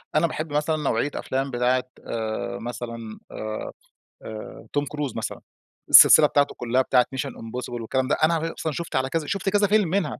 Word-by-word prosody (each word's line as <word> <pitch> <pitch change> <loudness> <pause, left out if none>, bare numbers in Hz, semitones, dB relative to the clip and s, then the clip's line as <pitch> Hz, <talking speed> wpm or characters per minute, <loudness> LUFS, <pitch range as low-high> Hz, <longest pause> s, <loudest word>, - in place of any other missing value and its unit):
أنا 160 +2 +4
باحب 155 -1 -5
مثلًا 150 +2 +1
نوعية 145 -2 0
أفلام 135 +1 -2
بتاعة 125 +1 +1 0.2
آآ، 115 +1 -3
مثلًا 115 -2 -7
آآ - - -7 0.8
آآ 110 -1 -9
توم 145 0 +1
كروز 145 -3 -4
مثلًا - - -4 0.5
السلسلة 150 - +9
بتاعته 145 -1 +1
كلّها 125 +2 +1
بتاعة 125 -1 +3
Mission 130 - -2
impossible 120 +3 -7
والكلام 130 +3 -1
ده، 145 - +2
أنا 165 +1 +4
غ 165 +1 -3
أصلًا 160 - -3
شُفت 170 +4 -5
على 130 0 +1
كذا 160 -1 -2
شُفت 195 +3 -1
كذا 205 +1 +3
فيلم 205 -3 +3
منها، 180 -3 -1
135 Hz, 185 wpm, -24 LUFS, 120-155 Hz, 0.8 s, السلسلة